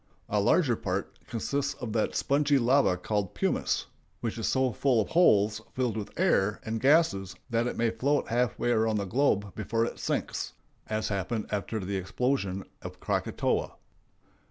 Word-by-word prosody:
A - - +1
larger - - +3
part - - -4
consists 140 +4 -2
of 120 -3 -5
that 110 -2 0
spongy 140 0 +2
lava 125 -6 +3
called 100 0 -2
pumice, - - 0 0.3
which 115 -1 -3
is 110 - -1
so 130 -1 +2
full 130 -2 +2
of 105 - 0
holes 105 - +4
filled 125 -4 0
with 105 +6 -6
air 105 - +2
and 110 0 -3
gases 135 - +3 0.2
that 115 +1 +1
it - - -4
may 115 -1 +2
float 140 +5 0
half 120 0 +1
way 120 - 0
around 110 -1 +2
the 100 - -1
globe 105 -3 +1
before 115 +2 0
it - - -6
sinks, - - -2 0.3
as 110 0 -1
happened 100 +2 -2
after 105 +2 -2
the 100 0 -3
explosion 95 0 -1 0.2
of - - -8
Krakatoa. - - -1
115 Hz, 165 wpm, -28 LUFS, 105-130 Hz, 0.3 s, holes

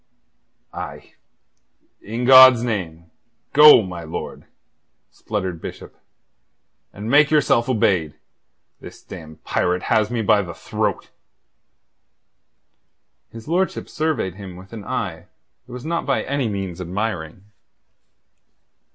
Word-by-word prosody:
"Aye, - - -9 0.9
in 115 +4 -4
God's 130 -2 +8
name, 85 -8 -5 0.4
go, 150 -5 +8
my 90 -3 -7
lord," 80 - -7 0.7
spluttered 95 -6 -5
Bishop, - - -9 1.0
"and 105 +2 -8
make 145 +4 +4
yourself 135 -5 +2
obeyed. 90 -10 +1 0.6
This - - -13
damned 80 -1 -12
pirate 90 0 -1
has 110 -1 +2
me 120 -2 -2
by 105 0 +3
the 85 -4 -8
throat." - - -3 2.2
His 115 0 -12
lordship 180 +4 -1
surveyed 150 - -2
him 95 -2 -10
with 95 +4 -14
an 105 -3 -8
eye - - -4 0.4
that - - -14
was 125 +3 -8
not 170 0 -3
by 135 - 0
any 140 -4 -2
means 95 -3 -5
admiring. 90 -2 -4
105 Hz, 110 wpm, -21 LUFS, 90-130 Hz, 2.2 s, God's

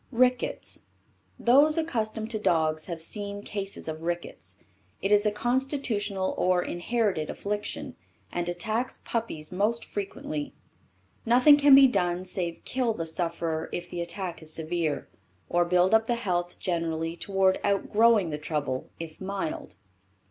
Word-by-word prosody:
RICKETS. 250 0 0 0.5
Those 290 +6 +5
accustomed 225 -8 -2
to 215 - -2
dogs 160 -5 +1
have 170 -3 -4
seen 205 +1 -5
cases 200 -4 -5
of 160 0 -5
rickets. 165 - -5 0.4
It 195 - -1
is 210 +1 +5
a - - +2
constitutional 235 -5 -1
or 180 -1 +3
inherited 185 -3 -1
affliction, 205 +1 -4 0.4
and 175 0 -2
attacks 220 +8 -1
puppies 205 -10 -3
most 210 +5 0
frequently. 190 -7 -5 0.7
Nothing 250 +5 +7
can 285 -1 +7
be 275 0 +9
done 180 -7 +1
save 175 -2 -3
kill 250 -4 0
the 165 - -3
sufferer 165 -1 -1
if 175 0 -5
the 175 - -3
attack 175 0 -4
is 160 0 -6
severe, 160 -1 -2 0.4
or 175 0 +3
build 180 +2 +3
up 220 0 +4
the 240 - +2
health 175 -6 -2
generally, 165 -2 -2
toward 190 +1 +2
outgrowing 205 -1 +3
the 150 - -3
trouble, 150 -4 -3
if 165 0 -8
mild. 190 -4 -4
190 Hz, 140 wpm, -27 LUFS, 170-225 Hz, 0.7 s, be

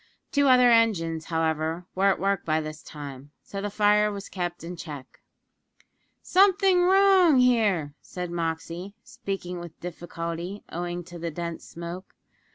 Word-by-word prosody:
Two 285 -1 +3
other 250 -2 +6
engines, 165 -9 +2
however, 160 +1 -1
were 195 +1 +2
at 195 - +2
work 195 -1 0
by 155 0 +1
this 155 -1 -6
time 140 -2 -9
so 195 - -6
the 205 - -2
fire 210 +1 +3
was 200 -1 -7
kept 175 -2 -4
in 175 +2 -6
check. 145 -6 -9 1.0
"Something 380 -1 +4
wrong 380 -5 +5
here," 215 - +3
said 180 -1 -6
Moxey, 170 +3 -4
speaking 195 -7 -5
with 175 -2 -10
difficulty, 170 +2 -6
owing 175 +1 -4
to 175 0 -10
the 170 0 -3
dense 170 +1 -5
smoke. 170 +2 -8
175 Hz, 145 wpm, -26 LUFS, 165-210 Hz, 1.0 s, other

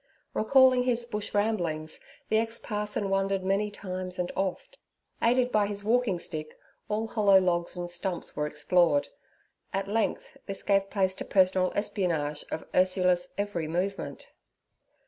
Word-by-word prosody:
Recalling 255 +2 +5
his 240 -1 0
Bush 210 -3 -4
ramblings, 175 -8 0 0.3
the 220 - +4
ex 225 +1 0
parson 210 -2 -2
wandered 195 0 +1
many 195 +2 +1
times 185 -2 -6
and 180 -1 -2
oft; 195 - -3 0.4
aided 250 +1 +3
by 210 -1 +3
his 200 0 -5
walking 225 -3 +2
stick, 155 -3 -6 0.3
all 215 +1 0
hollow 205 -4 +5
logs 175 -1 0
and 175 0 -3
stumps 175 +1 -4
were 150 - -1
explored. 150 0 +2 0.6
At 195 0 -2
length 220 +2 -1
this 195 -1 -5
gave 195 -1 +2
place 190 -2 +1
to - - -6
personal 185 -1 +3
espionage 165 -8 -1
of 160 - -4
Ursula's 180 -1 +2
every 200 -6 -2
movement. 185 +5 -3
195 Hz, 145 wpm, -28 LUFS, 180-210 Hz, 0.6 s, Recalling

